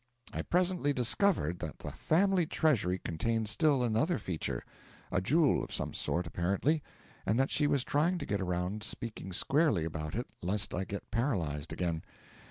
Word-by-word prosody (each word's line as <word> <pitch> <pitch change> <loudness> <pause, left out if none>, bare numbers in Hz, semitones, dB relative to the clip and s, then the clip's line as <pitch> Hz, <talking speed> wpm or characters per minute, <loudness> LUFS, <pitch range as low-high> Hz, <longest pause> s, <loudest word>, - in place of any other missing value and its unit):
I - - -2
presently 175 -4 +2
discovered 125 - +2
that - - -5
the - - -6
family 185 0 +2
treasury 110 - +2
contained 110 +7 -1
still 140 +3 +3
another 125 +9 +1
feature 80 -8 -3 0.5
a 90 - +1
jewel 150 - +3
of - - -7
some - - -3
sort, 85 +1 -1
apparently 100 - +1 0.4
and 110 +5 +1
that 135 - +2
she 150 -1 +3
was 140 -3 +2
trying 160 +7 +1
to - - -4
get 100 -1 -1
around 90 +3 -2
speaking 110 -3 -4
squarely 135 - +2
about 75 -1 -4
it, 120 +2 -1 0.2
lest 100 +4 -1
I 95 +2 -1
get 100 +1 -7
paralysed 85 - -1
again. 85 -3 -1
110 Hz, 165 wpm, -32 LUFS, 90-150 Hz, 0.5 s, still